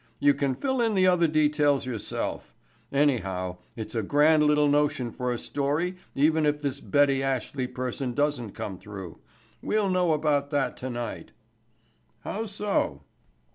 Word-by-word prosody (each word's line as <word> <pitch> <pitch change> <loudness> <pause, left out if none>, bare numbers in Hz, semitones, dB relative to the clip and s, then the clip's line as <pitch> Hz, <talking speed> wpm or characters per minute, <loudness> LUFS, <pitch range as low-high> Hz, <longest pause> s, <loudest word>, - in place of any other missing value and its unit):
You 145 +4 +4
can 140 -2 -1
fill 265 - -1
in 225 -3 +1
the 185 -1 +4
other 180 -2 +4
details 150 -2 +2
yourself. 120 -4 -4 0.4
Anyhow, 95 -11 0 0.2
it's 110 +1 -6
a 115 - 0
grand 150 +8 +4
little 150 0 +4
notion 145 -4 +1
for 125 +1 -2
a 120 - -1
story 145 +9 -1 0.2
even 155 +3 +3
if 150 0 +1
this 140 -1 -3
Betty 140 -2 +3
Ashley 135 -1 -2
person 125 0 -4
doesn't 145 -7 0
come 95 -3 -6
through. 95 -5 -9 0.4
We'll 210 -3 +1
know 180 -3 +2
about 145 -2 +1
that 145 -2 0
tonight." 120 -2 -5 0.9
"How 220 +2 -4
so?" 205 0 -1
145 Hz, 145 wpm, -27 LUFS, 125-155 Hz, 0.9 s, You